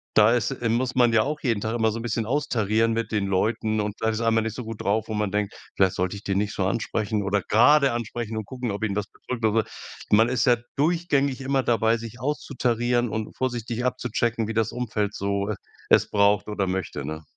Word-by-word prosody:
da 110 Hz, +1 st, +6 dB
ist 120 Hz, +2 st, 0 dB
äh, 120 Hz, -3 st, -2 dB
muss 125 Hz, +2 st, 0 dB
man 120 Hz, -2 st, +4 dB
ja 110 Hz, -1 st, +4 dB
auch 150 Hz, +2 st, -3 dB
jeden 115 Hz, -6 st, +1 dB
Tag 110 Hz, +2 st, -2 dB
immer 110 Hz, -1 st, +2 dB
so 110 Hz, -, -4 dB
'n 115 Hz, -, -5 dB
bisschen 115 Hz, -1 st, -2 dB
austarieren 115 Hz, -5 st, +1 dB
mit 115 Hz, -1 st, -2 dB
den 105 Hz, -3 st, 0 dB
Leuten 110 Hz, +3 st, 0 dB
und 105 Hz, 0 st, -3 dB
vielleicht 110 Hz, 0 st, 0 dB
ist 110 Hz, -, -3 dB
einmal 115 Hz, -1 st, +2 dB
nicht 110 Hz, -1 st, -3 dB
so 125 Hz, -, -5 dB
gut 115 Hz, -1 st, -7 dB
drauf, 110 Hz, +2 st, 0 dB
wo 110 Hz, -, -3 dB
man 105 Hz, -2 st, -1 dB
denkt, 105 Hz, -1 st, -1 dB, 0.2 s
vielleicht 95 Hz, -2 st, +3 dB
sollte 90 Hz, +2 st, -1 dB
ich 100 Hz, -, -9 dB
den 95 Hz, -1 st, -1 dB
nicht 105 Hz, 0 st, -1 dB
so 95 Hz, -2 st, 0 dB
ansprechen 105 Hz, 0 st, -1 dB
oder 100 Hz, +1 st, +1 dB
grade 140 Hz, +4 st, +5 dB
ansprechen 115 Hz, -1 st, -4 dB
und 110 Hz, -, -4 dB
gucken, 125 Hz, -1 st, -5 dB
ob 100 Hz, +1 st, -4 dB
ihn 100 Hz, -2 st, -1 dB
was 105 Hz, 0 st, -2 dB
bedrückt 125 Hz, -3 st, -7 dB
oder 110 Hz, +1 st, +3 dB
so. -, -, -3 dB
Man 115 Hz, +3 st, +5 dB
ist 125 Hz, -2 st, +1 dB
ja 120 Hz, -1 st, +5 dB, 0.2 s
durchgängig 145 Hz, -3 st, +1 dB
immer 135 Hz, 0 st, +1 dB
dabei, 115 Hz, -1 st, +2 dB
sich 115 Hz, 0 st, -9 dB
auszutarieren 120 Hz, -4 st, 0 dB
und 110 Hz, 0 st, -4 dB
vorsichtig 120 Hz, -2 st, -2 dB
abzuchecken, 120 Hz, -2 st, -1 dB
wie 115 Hz, -, -3 dB
das 110 Hz, -1 st, +1 dB
Umfeld 105 Hz, -4 st, -2 dB
so 100 Hz, +1 st, -1 dB, 0.4 s
es -, -, +5 dB
braucht 100 Hz, -1 st, +3 dB
oder 105 Hz, -2 st, -1 dB
möchte, 95 Hz, -6 st, -3 dB
ne? 80 Hz, +1 st, -5 dB
110 Hz, 230 wpm, -25 LUFS, 105-120 Hz, 0.4 s, da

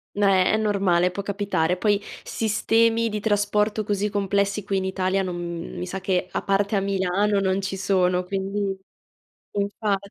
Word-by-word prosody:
No, 205 Hz, 0 st, +2 dB
è 185 Hz, -2 st, +4 dB
è -, -, +3 dB
normale, 195 Hz, -4 st, +2 dB
può 200 Hz, +2 st, -4 dB
capitare. 195 Hz, -4 st, 0 dB
Poi, 205 Hz, +1 st, +2 dB, 0.2 s
sistemi 225 Hz, +1 st, +2 dB
di 210 Hz, 0 st, -3 dB
trasporto 210 Hz, 0 st, +1 dB
così 205 Hz, 0 st, -1 dB
complessi 200 Hz, 0 st, 0 dB
qui 195 Hz, 0 st, -1 dB
in 190 Hz, -, -1 dB
Italia 190 Hz, 0 st, 0 dB
non 180 Hz, -2 st, -3 dB
mhmm, 170 Hz, -1 st, -5 dB
mi 180 Hz, -, -3 dB
sa, 190 Hz, +1 st, -5 dB
che 185 Hz, -1 st, 0 dB
a -, -, -2 dB
parte 200 Hz, +2 st, +1 dB
a -, -, +3 dB
Milano 195 Hz, +1 st, +1 dB
non 190 Hz, 0 st, +1 dB
ci 195 Hz, 0 st, -3 dB
sono, 185 Hz, -2 st, +2 dB
quindi 195 Hz, +1 st, -2 dB, 0.8 s
infa 200 Hz, 0 st, -1 dB
195 Hz, 170 wpm, -24 LUFS, 190-205 Hz, 0.8 s, è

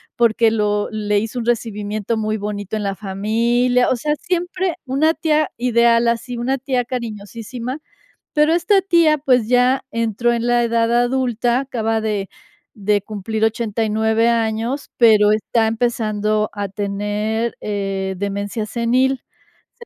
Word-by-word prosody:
porque 230 Hz, -1 st, +3 dB
lo 210 Hz, -1 st, 0 dB
le 210 Hz, -1 st, 0 dB
hizo 225 Hz, +4 st, -4 dB
un 230 Hz, -, -4 dB
recibimiento 215 Hz, -2 st, -2 dB
muy 215 Hz, 0 st, -1 dB
bonito 205 Hz, 0 st, -4 dB
en 210 Hz, -, -3 dB
la 195 Hz, -1 st, -2 dB
familia. 230 Hz, +6 st, +1 dB
O 255 Hz, -, +1 dB
sea, 300 Hz, +5 st, -1 dB
siempre 360 Hz, +1 st, -2 dB
una 285 Hz, +5 st, +2 dB
tía 310 Hz, -2 st, +1 dB
ideal 235 Hz, -1 st, +3 dB
así, 235 Hz, +1 st, -1 dB
una 260 Hz, +3 st, 0 dB
tía 255 Hz, -1 st, -1 dB
cariñosísima, 235 Hz, +2 st, -6 dB, 0.5 s
pero 300 Hz, +1 st, +3 dB
esta 350 Hz, +4 st, +3 dB
tía, 335 Hz, -5 st, +3 dB
pues, 255 Hz, -5 st, +2 dB
ya 250 Hz, +2 st, +3 dB
entró 230 Hz, +1 st, 0 dB
en 235 Hz, 0 st, -1 dB
la 240 Hz, 0 st, +3 dB
edad 230 Hz, 0 st, +1 dB
adulta, 245 Hz, 0 st, +1 dB
acaba 225 Hz, -4 st, -1 dB
de 210 Hz, -3 st, -2 dB, 0.5 s
de 205 Hz, 0 st, +1 dB
cumplir 215 Hz, +1 st, -3 dB
89 220 Hz, 0 st, +1 dB
años, 230 Hz, +3 st, -1 dB
pero 215 Hz, -3 st, +5 dB
está 220 Hz, +1 st, +1 dB
empezando 215 Hz, -2 st, 0 dB
a 205 Hz, -1 st, -3 dB
tener, 210 Hz, +3 st, -2 dB
eh, 195 Hz, -2 st, -3 dB
demencia 200 Hz, +2 st, -3 dB
senil. 250 Hz, +3 st, +1 dB, 0.5 s
Se 470 Hz, -, -12 dB
230 Hz, 140 wpm, -19 LUFS, 210-250 Hz, 0.5 s, pero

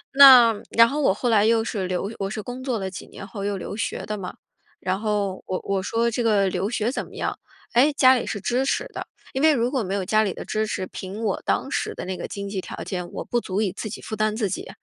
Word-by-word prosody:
那 255 Hz, -5 st, +9 dB
然 230 Hz, 0 st, +6 dB
后 290 Hz, +4 st, -2 dB
我 270 Hz, -, +4 dB
后 240 Hz, +4 st, -1 dB
来 215 Hz, -3 st, +4 dB
又 225 Hz, 0 st, +3 dB
是 205 Hz, -5 st, -3 dB
留 185 Hz, +3 st, -2 dB
我 195 Hz, -, -2 dB
是 215 Hz, +1 st, -4 dB
工 245 Hz, +3 st, -7 dB
作 255 Hz, -3 st, -1 dB
了 190 Hz, -2 st, -3 dB
几 190 Hz, -, -8 dB
年 -, -, -10 dB
后 200 Hz, 0 st, -6 dB
又 200 Hz, 0 st, -1 dB
留 190 Hz, -, -6 dB
学 225 Hz, -, -3 dB
的 215 Hz, -, -3 dB
嘛。 185 Hz, -2 st, -6 dB, 0.4 s
然 185 Hz, +1 st, -1 dB
后 205 Hz, -3 st, -1 dB
我 185 Hz, -, -2 dB
我 195 Hz, -1 st, -1 dB
说 230 Hz, +4 st, 0 dB
这 235 Hz, -, -1 dB
个 205 Hz, -4 st, +3 dB
留 185 Hz, +2 st, -1 dB
学 235 Hz, 0 st, 0 dB
怎 -, -, -3 dB
么 -, -, -15 dB
样？ -, -, -3 dB, 0.3 s
哎， 265 Hz, +6 st, +5 dB
家 260 Hz, -2 st, +6 dB
里 245 Hz, -, -1 dB
是 205 Hz, -, -3 dB
支 250 Hz, +6 st, 0 dB
持 385 Hz, -, 0 dB
的。 -, -, -6 dB, 0.2 s
因 265 Hz, -, -2 dB
为 315 Hz, 0 st, +6 dB
如 245 Hz, -2 st, +1 dB
果 265 Hz, -3 st, 0 dB
没 195 Hz, -1 st, -2 dB
有 200 Hz, -, -1 dB
家 215 Hz, +3 st, +3 dB
里 200 Hz, -4 st, -1 dB
的 -, -, -7 dB
支 215 Hz, 0 st, -1 dB
持， 190 Hz, -, -3 dB
凭 195 Hz, +5 st, -7 dB
我 220 Hz, -, -1 dB
当 -, -, 0 dB
时 -, -, -2 dB
的 -, -, -6 dB
那 185 Hz, 0 st, -3 dB
个 -, -, -5 dB
经 200 Hz, 0 st, -6 dB
济 195 Hz, -, -3 dB
条 -, -, -7 dB
件， 180 Hz, -2 st, -4 dB
我 -, -, -5 dB
不 240 Hz, -, 0 dB
足 195 Hz, 0 st, -2 dB
以 205 Hz, -4 st, 0 dB
自 215 Hz, +4 st, -6 dB
己 210 Hz, -, -7 dB
负 215 Hz, -, -5 dB
担 215 Hz, 0 st, 0 dB
自 215 Hz, -4 st, -1 dB
己。 -, -, -5 dB
215 Hz, 295 characters per minute, -24 LUFS, 195-235 Hz, 0.4 s, 那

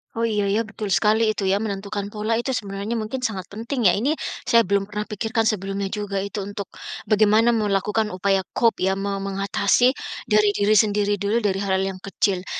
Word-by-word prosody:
Oh 230 Hz, -, -2 dB
iya 205 Hz, -2 st, 0 dB
ya, 205 Hz, +3 st, +1 dB
betul 215 Hz, -3 st, -4 dB
sekali 215 Hz, +1 st, +3 dB
itu -, -, -5 dB
ya 195 Hz, -, +3 dB
menentukan 200 Hz, -1 st, -3 dB
pola 220 Hz, +1 st, 0 dB
itu 260 Hz, +3 st, -2 dB
sebenarnya 200 Hz, 0 st, -3 dB
mungkin 225 Hz, +3 st, -3 dB
sangat 190 Hz, -6 st, -4 dB
penting 230 Hz, +1 st, 0 dB
ya? 180 Hz, -, +2 dB
Ini 270 Hz, +8 st, +1 dB, 0.3 s
saya 230 Hz, 0 st, +5 dB
belum 200 Hz, 0 st, 0 dB
pernah 210 Hz, +1 st, -5 dB
pikirkan 220 Hz, +2 st, -1 dB
sebelumnya 195 Hz, -2 st, -1 dB
juga 200 Hz, -2 st, -3 dB
itu 200 Hz, +1 st, -5 dB
untuk, 200 Hz, -1 st, -6 dB, 0.4 s
bagaimana 215 Hz, +2 st, +4 dB
melakukan 210 Hz, -1 st, 0 dB
upaya 195 Hz, 0 st, +1 dB
cope 230 Hz, -6 st, +2 dB
ya 190 Hz, -, +2 dB
me 195 Hz, +1 st, -3 dB
mengatasi 195 Hz, +4 st, +2 dB, 0.4 s
dari 210 Hz, -1 st, +4 dB
diri 210 Hz, +1 st, +3 dB
sendiri 205 Hz, -1 st, +2 dB
dulu 210 Hz, +4 st, 0 dB
dari 195 Hz, -2 st, 0 dB
hal 190 Hz, -1 st, 0 dB
yang 195 Hz, -1 st, -3 dB
kecil. 190 Hz, -1 st, -1 dB
205 Hz, 185 wpm, -23 LUFS, 195-220 Hz, 0.4 s, saya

